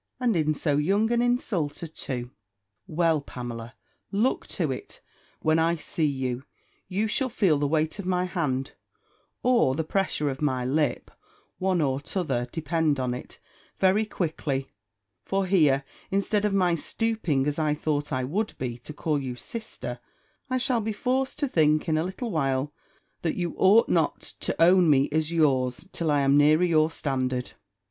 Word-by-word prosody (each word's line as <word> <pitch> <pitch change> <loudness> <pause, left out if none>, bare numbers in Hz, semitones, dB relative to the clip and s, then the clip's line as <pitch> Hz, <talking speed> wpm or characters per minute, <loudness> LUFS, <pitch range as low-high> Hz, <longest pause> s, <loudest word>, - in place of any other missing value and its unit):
And 245 -4 +2
in 155 -2 +1
so 145 -1 +1
young 200 +9 +2
an 240 0 +3
insulter 195 -11 0
too! 125 -6 -5 0.6
Well, 165 -3 +2
Pamela, 120 -2 -7 0.4
look 215 +6 +1
to 160 -8 -2
it, 130 - -7 0.4
when 155 +1 +3
I 165 +1 +2
see 155 0 -1
you: 130 -3 -2 0.5
you 205 +4 0
shall 255 +4 0
feel 185 -10 +2
the 145 - +1
weight 155 +5 0
of 190 - -5
my 180 -1 +1
hand, 140 -8 -2 0.7
or 235 - +3
the 160 - -1
pressure 170 -3 0
of 135 - -7
my 130 -4 0
lip, 140 -1 0 0.5
one 185 -2 +1
or 135 -2 +1
t'other, 140 -8 -2
depend 160 -2 0
on 125 -1 -1
it, 125 - -8 0.4
very 190 +3 +3
quickly; 155 -9 -3 0.5
for 195 0 0
here, 150 -8 +3 0.3
instead 200 +2 +1
of 210 - +1
my 180 -3 +3
stooping, 170 - 0
as 150 +1 -1
I 150 -1 +1
thought 150 -1 -2
I 130 -2 0
would 200 +12 -2
be, 125 -2 -4
to 150 - -8
call 150 -1 -1
you 130 -2 -4
sister, 125 - -6 0.5
I 255 - +1
shall 250 -2 +1
be 220 0 -2
forced 260 +5 -1
to 290 - 0
think, 155 - +2
in 160 - +2
a 155 - +1
little 190 +6 -4
while, 135 -3 0 0.5
that 165 - -1
you 175 -2 -2
ought 205 +5 +5
not 165 -3 +1 0.2
to - - -3
own 175 0 +6
me 140 -1 +4
as 155 +1 0
yours, 135 -3 +1
till 165 -2 -2
I 145 -1 +3
am 140 +1 +4
nearer 155 +3 +5
your 160 -3 +3
standard. 130 -5 -2
155 Hz, 170 wpm, -26 LUFS, 140-190 Hz, 0.7 s, own